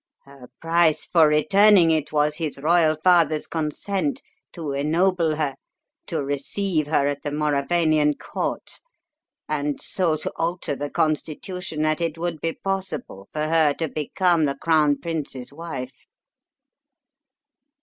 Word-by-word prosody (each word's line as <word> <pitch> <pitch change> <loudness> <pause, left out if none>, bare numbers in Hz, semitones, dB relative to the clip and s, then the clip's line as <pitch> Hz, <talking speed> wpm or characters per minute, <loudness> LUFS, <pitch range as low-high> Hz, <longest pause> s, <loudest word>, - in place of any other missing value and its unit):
Her 140 -3 -15
price 165 -1 +2
for 165 -3 +4
returning 180 +4 +5
it 155 -2 0
was 150 0 +1
his 160 -5 -3
royal 155 +1 +3
father's 170 -4 +4
consent 195 - -2 0.3
to 160 -5 -5
ennoble 160 +3 +1
her, 150 -3 -1 0.5
to - - -2
receive 155 +4 -1
her 150 -2 +2
at 145 0 -2
the 145 - -3
Mauravanian 150 +1 +1
Court, - - -5 0.7
and 145 -1 -2
so 170 -5 0
to - - -4
alter 170 -3 -2
the 145 +1 -4
constitution 155 +2 -2
that 155 +2 0
it 165 -1 -2
would 165 -2 -4
be 165 0 -1
possible 185 - -4
for 150 - -2
her 155 -2 +3
to 165 - -2
become 160 +3 +1
the 140 -1 -2
crown 150 -2 +2
prince's 145 -6 -5
wife." 140 -5 -7
155 Hz, 130 wpm, -23 LUFS, 145-170 Hz, 0.7 s, returning